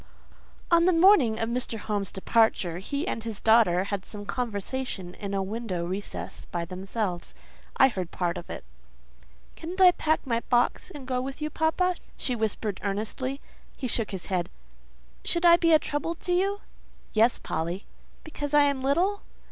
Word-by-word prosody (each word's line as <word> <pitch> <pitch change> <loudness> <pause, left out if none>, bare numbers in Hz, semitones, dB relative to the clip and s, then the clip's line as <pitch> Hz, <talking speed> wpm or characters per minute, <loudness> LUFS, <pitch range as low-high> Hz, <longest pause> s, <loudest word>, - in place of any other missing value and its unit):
On 340 0 +6
the 365 - +4
morning 330 - +5
of 225 - 0
Mr. 235 -1 -2
Home's 205 -2 -2
departure, 190 -4 +2
he 280 - -3
and 225 - -3
his 225 -3 -5
daughter 220 -6 +4
had 200 -1 -3
some 205 0 -9
conversation 210 -3 -4
in 200 0 -5
a 195 - 0
window 195 -4 -3
recess 190 +3 -5
by 170 -1 -3
themselves; 185 0 -4 0.4
I 265 - +7
heard 185 -9 -4
part 175 -1 -1
of 175 - -8
it. - - -6 0.9
"Couldn't 350 +4 -7
I 370 -1 +9
pack 315 -3 0
my 230 -3 +1
box 245 +7 +2
and 290 -7 -9
go 255 -1 -1
with 270 +2 -6
you, 305 0 -3
papa?" 345 +4 +1 0.2
she 250 - -2
whispered 220 -2 -2
earnestly. 220 +7 -2 0.4
He 265 - -5
shook 230 -2 0
his 190 -3 -5
head. 180 -3 -1 0.7
"Should 345 0 +1
I 340 0 +9
be 335 -1 +2
a 315 - +8
trouble 300 +3 -3
to 355 +1 -2
you?" 395 +3 +1 0.5
"Yes, 230 +2 +4
Polly." 170 +5 -3 0.4
"Because 295 -2 -3
I 295 - +7
am 280 -2 +1
little?" 350 +10 +1
235 Hz, 170 wpm, -27 LUFS, 200-305 Hz, 0.9 s, I